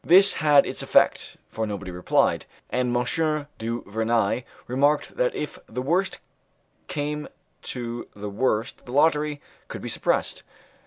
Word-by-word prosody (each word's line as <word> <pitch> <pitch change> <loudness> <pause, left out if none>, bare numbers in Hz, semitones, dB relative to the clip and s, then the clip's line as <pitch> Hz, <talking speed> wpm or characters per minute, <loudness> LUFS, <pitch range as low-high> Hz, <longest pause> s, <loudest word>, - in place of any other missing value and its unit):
This 195 +4 +7
had 150 -2 +6
its - - -3
effect, - - +2
for 110 0 -3
nobody 100 -3 -5
replied; 90 +1 +1 0.2
and 125 -1 +1
M. 150 +4 0
du 115 +2 -3
Vernai 110 +2 0 0.2
remarked 140 +4 +1
that 125 - +1
if 150 - -4
the 125 +3 -4
worst 180 +7 0 0.7
came 150 0 -3 0.3
to 120 -1 -5
the 105 0 -6
worst 110 +2 0
the 120 - -7
lottery 150 0 +3 0.3
could - - -7
be - - -4
suppressed. - - 0
125 Hz, 140 wpm, -25 LUFS, 115-150 Hz, 0.7 s, This